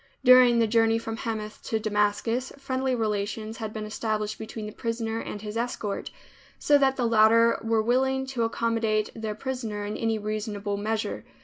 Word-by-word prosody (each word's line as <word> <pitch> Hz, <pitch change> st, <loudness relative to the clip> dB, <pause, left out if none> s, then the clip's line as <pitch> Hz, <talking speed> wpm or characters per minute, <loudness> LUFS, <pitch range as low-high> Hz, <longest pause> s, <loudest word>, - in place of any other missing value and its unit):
During 250 Hz, -2 st, +7 dB
the 230 Hz, -, +4 dB
journey 225 Hz, 0 st, +3 dB
from 225 Hz, 0 st, -4 dB
Hamath 215 Hz, -1 st, -5 dB
to 220 Hz, -, 0 dB
Damascus, 215 Hz, +4 st, 0 dB
friendly 265 Hz, -1 st, -1 dB
relations 215 Hz, 0 st, -2 dB
had 220 Hz, -2 st, -5 dB
been 215 Hz, -1 st, -5 dB
established 215 Hz, 0 st, -2 dB
between 220 Hz, 0 st, -6 dB
the 210 Hz, -, -6 dB
prisoner 225 Hz, 0 st, -3 dB
and 210 Hz, -, -6 dB
his 210 Hz, 0 st, -6 dB
escort, 230 Hz, -3 st, -3 dB, 0.5 s
so 290 Hz, -1 st, +4 dB
that 270 Hz, -1 st, +3 dB
the 250 Hz, -, 0 dB
latter 230 Hz, +1 st, +5 dB
were 225 Hz, -1 st, +1 dB
willing 265 Hz, +3 st, +1 dB
to 265 Hz, -3 st, -3 dB
accommodate 225 Hz, -2 st, 0 dB
their 220 Hz, -1 st, -4 dB
prisoner 225 Hz, -4 st, -4 dB
in 210 Hz, -, -4 dB
any 225 Hz, -1 st, 0 dB
reasonable 210 Hz, -1 st, -3 dB
measure. 215 Hz, +2 st, -2 dB
225 Hz, 170 wpm, -26 LUFS, 215-235 Hz, 0.5 s, During